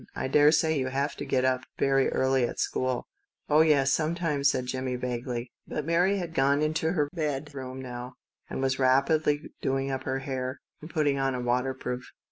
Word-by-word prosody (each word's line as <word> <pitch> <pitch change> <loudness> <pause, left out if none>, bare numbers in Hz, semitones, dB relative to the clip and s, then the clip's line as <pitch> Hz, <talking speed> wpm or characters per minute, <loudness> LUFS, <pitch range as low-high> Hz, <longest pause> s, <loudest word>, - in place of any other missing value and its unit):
I - - -2
daresay 150 +2 +4
you 130 - -1
have 140 +3 -1
to - - -5
get 130 -1 +1
up 130 -1 +2 0.2
very 135 -1 +3
early 130 -1 +2
at - - -7
school." 130 -1 -1 0.2
" - - -46
Oh, 150 +1 +6
yes, 140 -4 +4
sometimes," 155 -3 +1
said 130 -2 -1
Jimmie 130 0 -2
vaguely. 125 -1 -4 0.2
But 150 - -3
Mary 175 +5 +3
had 175 -3 -4
crossed 140 +1 +3
into 160 +2 0
her 150 -5 +1
tiny 155 -3 0
bedroom 135 -2 -5
now, 125 0 -7 0.3
and 130 - -3
was 130 0 0
rapidly 145 +3 +2
doing 135 0 0
up 130 0 -2
her 130 0 -1
hair, 130 -1 -4 0.2
and 155 - -9
putting 145 -4 +1
on 135 -1 +1
a - - -3
waterproof. 125 0 -1
135 Hz, 190 wpm, -28 LUFS, 130-150 Hz, 0.3 s, Oh